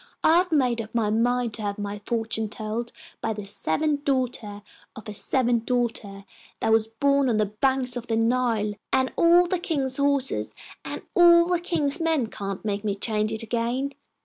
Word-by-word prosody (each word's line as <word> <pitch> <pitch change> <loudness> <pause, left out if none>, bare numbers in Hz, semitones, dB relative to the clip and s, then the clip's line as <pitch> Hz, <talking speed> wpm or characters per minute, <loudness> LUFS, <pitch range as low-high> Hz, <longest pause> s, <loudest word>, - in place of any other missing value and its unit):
I 325 - +5
have 360 0 +1
made 250 -6 +2
up 220 +1 -11
my 215 -3 +1
mind 240 +1 +1
to 220 - -6
have 205 0 -3
my 205 0 -5
fortune 225 -2 -1
told 220 +2 -4 0.3
by 225 - -1
the 210 -1 -7
seventh 285 - -1
daughter 245 -7 -1 0.3
of 220 - -10
a 210 - -5
seventh 235 +1 0
daughter, 225 -5 -2 0.3
that - - 0
was 220 0 +3
born 275 +4 +1
on 225 - +1
the 215 - +2
banks 255 +4 0
of 245 0 -5
the 225 - 0
Nile, 225 -2 +1 0.2
and 260 -1 +2
all 345 +1 +5
the 360 0 -1
king's 275 -7 0
horses 280 -2 0 0.3
and - - -6
all 340 -1 +7
the 355 -1 +1
king's 325 -3 0
men 320 -6 +1
can't 195 0 -6
make 200 -1 -2
me 205 -2 -1
change 215 +1 -1
it 220 0 -2
again. 240 +5 -2
235 Hz, 185 wpm, -25 LUFS, 215-280 Hz, 0.3 s, all